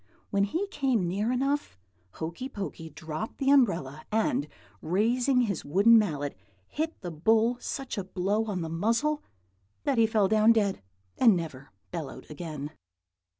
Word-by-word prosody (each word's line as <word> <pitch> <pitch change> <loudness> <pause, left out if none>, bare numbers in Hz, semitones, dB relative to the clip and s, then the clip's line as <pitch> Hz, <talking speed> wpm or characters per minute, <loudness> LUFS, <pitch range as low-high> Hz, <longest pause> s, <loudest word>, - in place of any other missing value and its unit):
When 200 0 +3
he 335 - -1
came 260 - +1
near 205 +6 0
enough, 270 - -1 0.4
Hokey 170 +11 -5
Pokey 195 -8 -6
dropped 155 +7 -6
the 275 0 +2
umbrella, 165 - +2
and 250 +6 +1 0.3
raising 240 - +2
his 200 -8 -1
wooden 205 +9 +6
mallet 145 - -2 0.3
hit 320 +2 -3
the 175 -3 -5
bull 225 +9 +2
such 270 -5 -4
a - - -2
blow 200 +4 -1
on 200 -5 -3
the 165 - -3
muzzle 230 - +1 0.6
that 275 -4 +1
he 225 - +5
fell 215 -3 +3
down 215 +2 +5
dead, 205 -4 +1 0.4
and 230 -6 +7
never 145 -5 -6 0.2
bellowed 155 -1 -7
again. 150 -2 -6
210 Hz, 150 wpm, -28 LUFS, 165-245 Hz, 0.6 s, and